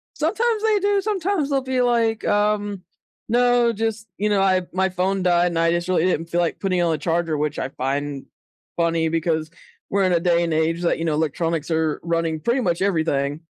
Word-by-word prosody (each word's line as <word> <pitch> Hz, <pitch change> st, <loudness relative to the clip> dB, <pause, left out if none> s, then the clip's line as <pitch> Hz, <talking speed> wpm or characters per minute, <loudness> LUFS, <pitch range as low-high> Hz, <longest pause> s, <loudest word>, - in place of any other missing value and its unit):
Sometimes 435 Hz, +7 st, 0 dB
they 435 Hz, -2 st, +3 dB
do, 405 Hz, 0 st, +1 dB
sometimes 385 Hz, -6 st, -1 dB
they'll 275 Hz, -1 st, +1 dB
be 260 Hz, -1 st, -1 dB
like, 230 Hz, -2 st, +1 dB
um, 205 Hz, -2 st, 0 dB, 0.5 s
"No, 245 Hz, 0 st, +3 dB
just, 220 Hz, 0 st, -3 dB
you 210 Hz, +1 st, 0 dB
know, 200 Hz, -2 st, +2 dB
I 185 Hz, -1 st, +2 dB
my 190 Hz, +1 st, +1 dB
phone 185 Hz, +1 st, -1 dB
died, 175 Hz, -1 st, +3 dB
and 170 Hz, -1 st, -1 dB
I 165 Hz, 0 st, +3 dB
just 175 Hz, +1 st, -1 dB
really 180 Hz, -2 st, +2 dB
didn't 170 Hz, -3 st, 0 dB
feel 175 Hz, -, +1 dB
like 170 Hz, -, -1 dB
putting 185 Hz, -2 st, 0 dB
it -, -, +2 dB
on 165 Hz, -2 st, +1 dB
a -, -, -1 dB
charger," 165 Hz, 0 st, -1 dB
which 150 Hz, 0 st, -2 dB
I 130 Hz, -, -3 dB
find 140 Hz, +1 st, -3 dB, 0.5 s
funny 165 Hz, -1 st, +1 dB
because 160 Hz, -1 st, -1 dB, 0.4 s
we're 200 Hz, 0 st, +1 dB
in 185 Hz, -, +2 dB
a 170 Hz, -, +3 dB
day 170 Hz, 0 st, +2 dB
and 165 Hz, -2 st, -1 dB
age 165 Hz, +2 st, 0 dB
that, 170 Hz, -, 0 dB
you 165 Hz, -, -2 dB
know, 160 Hz, -, 0 dB
electronics 160 Hz, +1 st, -1 dB
are 160 Hz, -2 st, 0 dB
running 165 Hz, -1 st, -1 dB
pretty 235 Hz, -, 0 dB
much 175 Hz, -5 st, -1 dB
everything. 155 Hz, -6 st, 0 dB
175 Hz, 215 wpm, -22 LUFS, 165-225 Hz, 0.5 s, they